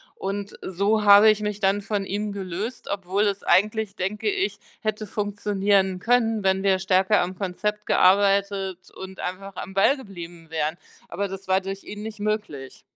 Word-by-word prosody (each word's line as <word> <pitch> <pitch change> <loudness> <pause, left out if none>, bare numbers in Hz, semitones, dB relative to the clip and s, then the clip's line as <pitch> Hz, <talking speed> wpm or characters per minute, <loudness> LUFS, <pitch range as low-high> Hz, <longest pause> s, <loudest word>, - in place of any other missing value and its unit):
Und 200 +1 -5
so 200 +4 +1
habe 205 +1 +8
ich 215 0 +2
mich 210 -1 -3
dann 200 0 +2
von 200 -1 -2
ihm 205 +2 -3
gelöst, 200 +4 -5
obwohl 195 +1 -1
es 200 -1 -1
eigentlich, 215 +1 +2
denke 205 - -2
ich, 405 0 -1 0.2
hätte 215 -1 -2
funktionieren 200 -2 0
können, 225 -1 +2
wenn 190 0 +2
wir 190 -1 +3
stärker 190 +2 +3
am 185 +1 -3
Konzept 210 +3 -3
gearbeitet 195 -1 +2
und 190 0 -9
einfach 190 +1 -5
am 190 - -6
Ball 270 +9 +4
geblieben 175 -7 -10
wären. 160 +1 -2 0.3
Aber 200 +4 -2
das 195 0 -8
war 190 +1 +3
durch 195 +1 -6
ihn 210 0 -8
nicht 215 -1 -7
möglich. 205 -11 -4
200 Hz, 165 wpm, -24 LUFS, 190-210 Hz, 0.3 s, habe